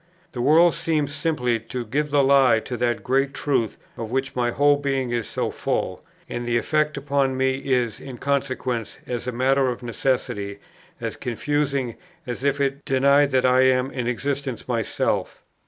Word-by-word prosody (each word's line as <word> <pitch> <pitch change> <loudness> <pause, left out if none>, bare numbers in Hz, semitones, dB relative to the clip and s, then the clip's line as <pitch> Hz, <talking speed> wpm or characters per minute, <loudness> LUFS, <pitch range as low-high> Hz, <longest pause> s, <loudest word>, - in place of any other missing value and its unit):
The 120 - -4
world 165 +6 +5
seems 150 -3 -1
simply 125 -8 0
to 120 +2 -6
give 145 +7 -1
the 145 -1 +3
lie 135 -4 +5
to 125 - -5
that 120 -1 -1
great 135 +2 +1
truth, 125 -7 0 0.2
of 115 -2 -5
which 135 +2 -2
my 120 -1 +1
whole 145 +3 +4
being 135 -3 -1
is 120 -2 -1
so - - -2
full; - - -2 0.2
and 120 0 -4
the 120 0 +2
effect 150 +4 0
upon 140 -1 0
me 130 0 +1
is, 125 -5 0
in 130 -3 -8
consequence, 130 -4 -2
as 120 0 -4
a - - 0
matter 130 +2 +2
of 125 0 -5
necessity, 115 -5 -2 0.4
as - - -4
confusing 135 0 -1 0.3
as 125 0 -5
if 140 0 +1
it 140 0 -1
denied 140 +1 +4
that 130 -2 +2
I 130 0 +5
am 130 0 +3
in 125 -2 -3
existence 135 +1 -3
myself. 115 -3 -1
130 Hz, 170 wpm, -23 LUFS, 120-140 Hz, 0.4 s, world